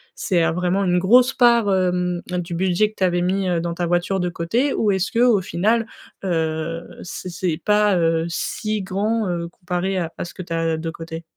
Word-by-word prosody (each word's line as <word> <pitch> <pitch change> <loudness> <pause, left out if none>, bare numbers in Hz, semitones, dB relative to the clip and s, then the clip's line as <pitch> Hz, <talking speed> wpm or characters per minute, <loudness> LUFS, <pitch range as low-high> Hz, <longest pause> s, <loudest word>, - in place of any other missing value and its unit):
c'est, 175 -4 +1
heu, - - +1
vraiment 180 +3 0
une 180 -1 +2
grosse 245 +7 +5
part, 235 -4 +4
hem, 180 -1 0
du 175 -1 -3
budget 185 +4 +2
que - - -28
tu - - -1
avais 175 -1 +2
mis, 190 +2 0
heu, 175 - +1
dans 170 0 -3
ta 175 +1 -2
voiture 175 +3 0
de 180 - 0
côté? 225 +12 0
Ou, 210 - +1
est-ce 190 -1 -1
que, 230 - -1
au 240 -5 +4
final 215 +6 +1 0.4
heu 165 -2 -1 0.2
c'est 180 +1 -7
c'est 170 -1 -2
pas, 210 -2 +3
heu, 165 -1 +1
si 215 +4 -2
grand, 210 +3 -1
heu, 170 -1 -2
comparé 180 +2 -3
à 170 -3 -2
à - - -3
ce 170 - -10
que - - -8
tu 170 - -6
as, 165 0 0
heu, - - -4
de 165 +1 -4
côté? 165 0 -7
180 Hz, 220 wpm, -21 LUFS, 170-200 Hz, 0.4 s, grosse